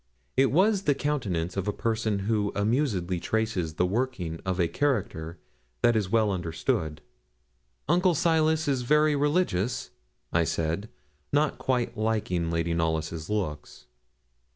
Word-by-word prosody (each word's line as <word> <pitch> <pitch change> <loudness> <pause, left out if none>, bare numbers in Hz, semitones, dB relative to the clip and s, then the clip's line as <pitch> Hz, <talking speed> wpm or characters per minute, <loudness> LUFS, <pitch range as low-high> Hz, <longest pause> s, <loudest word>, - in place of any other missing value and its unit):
It 135 0 +4
was 195 +5 +3
the 145 - +3
countenance 100 - -1
of 95 0 -2
a - - +2
person 110 -2 -1
who 105 -2 +1
amusedly 100 - 0
traces 100 -7 -1
the 90 - +2
working 95 -6 -2
of 95 0 -1
a 85 - +3
character 85 - -1 0.5
that 120 - +5
is 105 -4 0
well 110 -1 +3
understood. 80 -3 -2 0.9
'Uncle 175 +2 +3
Silas 160 0 +2
is 135 -3 +1
very 150 +4 +3
religious?' 135 - 0 0.4
I 85 - +4
said, 80 +5 -2 0.4
not 150 +1 +1
quite 125 -3 -1
liking 105 -6 0
Lady 85 0 0
Knollys' 80 0 -1
looks. 75 -11 -4
105 Hz, 130 wpm, -27 LUFS, 85-135 Hz, 0.9 s, that